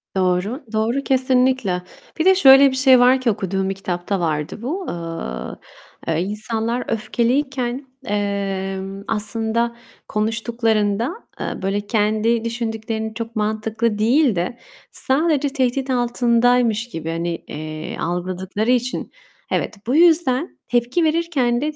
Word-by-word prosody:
Doğru, 190 - 0
doğru. 230 +5 0
Kesinlikle. 255 -7 +2 0.4
Bir 320 - +1
de 380 0 +7
şöyle 275 -5 +8
bir - - -3
şey 260 -1 +6
var 255 +1 +5
ki, 250 - +2
okuduğum 195 -2 -2
bir 195 - -2
kitapta 185 0 -3
vardı 155 +3 -2
bu: 340 +10 -3
Iıı, 165 - -5 0.5
eee, 165 0 +1
insanlar 220 +4 -2
öfkeliyken, 250 +3 -1 0.2
emm, 195 -1 -2
aslında 225 +2 -1 0.3
konuştuklarında, 225 - 0 0.3
eee, - - -4
böyle 195 +2 0
kendi 215 +2 +1
düşündüklerini 225 -1 -3
çok 230 0 -6
mantıklı 215 +1 -1
değil 240 +2 +3
de 180 +8 -2 0.3
sadece 290 +1 +1
tehdit 265 -1 -1
altındaymış 240 -2 +2
gibi, 165 -6 -5
hani, 170 +1 -2
eee, 155 +1 -6
algıladıkları 185 +5 -2
için, 250 0 -1 0.4
evet, - - -1
bu 255 - +1
yüzden 325 -3 +3
tepki 245 +7 +1
verirken 310 -7 +1
de 300 +1 -1
230 Hz, 120 wpm, -21 LUFS, 200-255 Hz, 0.5 s, şöyle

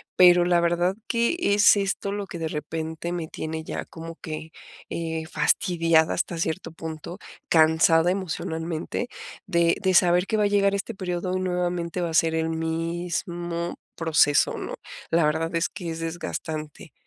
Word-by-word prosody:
pero 175 -1 +7
la 175 -1 +4
verdad 175 +2 +1
que 235 +7 +1
es 205 -7 +5
esto 200 0 -1
lo 205 -1 -4
que 170 - -7
de 165 - -2
repente 160 +2 -4
me 170 -2 -3
tiene 160 0 -5
ya - - -5
como 165 0 -9
que, 160 0 -6 0.4
eh, 160 -1 -3
fastidiada 165 -1 +2
hasta 175 -1 -2
cierto 165 +1 -2
punto, 160 +2 -7 0.3
cansada 160 +1 +5
emocionalmente, 165 +2 -3 0.4
de 170 -2 +3
de 190 -1 +2
saber 180 +1 +4
que 220 - 0
va 210 - +2
a - - +4
llegar 200 -1 +3
este 200 +3 -4
periodo, 180 0 -2
y - - 0
nuevamente 180 -1 -1
va 170 - -1
a - - -6
ser 160 0 +3
el 160 0 0
mismo 170 +1 -3 0.2
proceso, 155 -3 +3
¿no?, - - -5 0.3
la 165 -1 +3
verdad, 160 +2 0
es 165 - +2
que, 175 -3 -6
es 165 0 -4
desgastante. 160 -3 -5
170 Hz, 160 wpm, -25 LUFS, 160-180 Hz, 0.4 s, pero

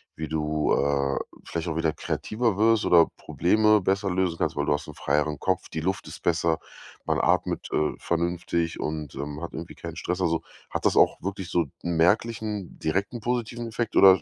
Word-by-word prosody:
wie 80 +1 -4
du, 75 -1 0
äh, 70 -1 +1 0.3
vielleicht 85 +1 -4
auch 80 - -2
wieder 80 -1 +2
kreativer 110 -2 -1
wirst 110 0 +4
oder 85 -2 +6
Probleme 105 +4 +3
besser 95 +1 +1
lösen 90 -2 0
kannst, - - -1
weil 70 - 0
du 75 - +2
hast 75 - -3
'n - - -8
freieren 75 0 0
Kopf, 95 -1 0
die 80 - -4
Luft 95 +3 -2
ist - - -9
besser, 80 -1 +2 0.5
man - - +1
atmet, - - +1
äh, 75 - +1
vernünftig 85 0 -1
und, 75 -2 -4
ähm, 70 +2 -5
hat 85 - -5
irgendwie 80 +1 -7
keinen 85 -1 -7
Stress? 90 +1 -2
Also, 85 -2 +1 0.3
hat - - -3
das - - +4
auch - - +4
wirklich 95 -1 -4
so 85 -2 +2 0.2
'n 85 -1 -1
merklichen 105 +2 +1
direkten 95 +8 -1
positiven 120 0 -2
Effekt 115 0 -3
oder 95 -1 +8
85 Hz, 190 wpm, -26 LUFS, 80-100 Hz, 0.5 s, oder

